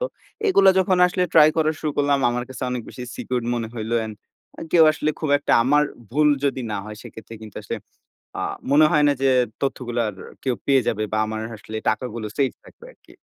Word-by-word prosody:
তো - - 0 0.4
এগুলা 195 - +6
যখন 185 -1 +2
আসলে 180 +1 -1
ট্রাই 150 - +8
করা 155 -1 +2
শুরু 155 - -1
করলাম, 145 -1 +2
আমার 120 0 -2
কাছে 130 0 -8
অনেক 125 -1 -3
বেশি 125 - -9
সিকিউরড 125 -2 -3
মনে 115 -2 -3
হইলো 115 0 -3
অ্যান্ড 110 -1 -5 0.6
কেউ 165 -2 +7
আসলে 155 0 -1
খুব 155 - -2
একটা - - -1
আমার 145 +3 +4 0.3
ভুল 150 +1 +4 0.2
যদি 135 -2 0
না - - -1
হয়, 105 0 -8
সেক্ষেত্রে 110 +1 -11
কিন্তু 105 - -9
আসলে - - -4 0.6
আ - - -2 0.3
মনে 155 +2 +6
হয় 150 -3 +4
না 145 - +4
যে 135 - +3 0.3
তথ্যগুলা 120 -3 -2
আর 95 - -10 0.3
কেউ 130 -2 0
পেয়ে 135 -2 +4
যাবে, 110 -1 0
বা 110 - 0
আমার 110 0 -4 0.2
আসলে 110 +1 -7
টাকাগুলো 115 0 -3
সেফ 135 -2 +1
থাকবে 470 - -16
আরকি। - - -21
130 Hz, 205 wpm, -22 LUFS, 115-150 Hz, 0.6 s, ট্রাই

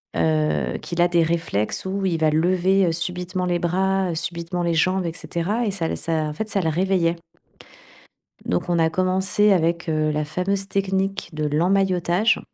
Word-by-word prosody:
heu, 75 -5 +1
qu'il 175 0 -2
a 175 - +5
des 170 -1 +3
réflexes 165 -11 -1
où 195 +1 -2
il 170 -3 0
va 155 - +4
lever, 185 +4 +2
heu, - - +2
subitement 180 +2 -2
les 175 -1 0
bras, 190 +1 0
heu, - - -3
subitement 170 +1 -3
les 170 -1 +1
jambes, 185 +2 +1
et 165 - -1
cetera 200 +8 -2
et 205 - 0
ça 170 -4 -2
l - - -3
ça, 165 - -3 0.2
en - - -5
fait 220 +7 -4
ça 195 - 0
le 160 - 0
réveillait. 175 0 +1 1.3
Donc, 90 - -1
on 170 -1 +2
a 160 0 +3
commencé 190 +4 +2
avec, 170 -2 +1
heu, 155 -1 +1
la 150 0 -1
fameuse 195 +5 -2
technique 195 -1 -1
de 155 0 -2
l'emmaillotage 180 +5 +2
175 Hz, 185 wpm, -22 LUFS, 165-190 Hz, 1.3 s, a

